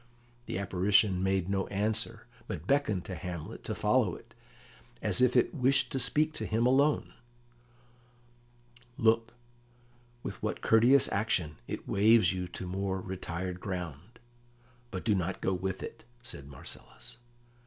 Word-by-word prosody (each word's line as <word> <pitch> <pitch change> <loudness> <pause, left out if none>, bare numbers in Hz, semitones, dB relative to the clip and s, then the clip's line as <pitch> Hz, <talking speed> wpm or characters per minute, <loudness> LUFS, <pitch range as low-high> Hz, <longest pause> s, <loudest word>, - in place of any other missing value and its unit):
The - - -3
apparition 95 0 +3
made 95 -1 +1
no 95 -1 0
answer, 105 +2 -2 0.2
but 80 - -5
beckoned 110 -7 +1
to 95 - -5
Hamlet 85 -1 -6
to - - -3
follow - - +2
it, - - -15 0.7
as - - +1
if 125 0 +4
it 125 - +3
wished 135 -2 +2
to 135 - -1
speak 150 +5 +2
to - - -4
him 115 +2 +1
alone. 140 +4 +3 1.8
"Look, 115 -1 +2 0.9
with - - -6
what - - -2
courteous 120 +5 +5
action 95 -7 0
it - - -6
waves 105 -3 +5
you 90 -1 -3
to 90 - -7
more 95 +1 -2
retired 90 -1 -5
ground. 90 - -6 0.7
But 95 -5 -6
do 110 - +3
not 95 -1 -1
go 95 - 0
with 95 +1 -3
it," - - -8 0.2
said 70 -12 -7
Marcellus. 70 - -10
100 Hz, 140 wpm, -30 LUFS, 90-115 Hz, 1.8 s, courteous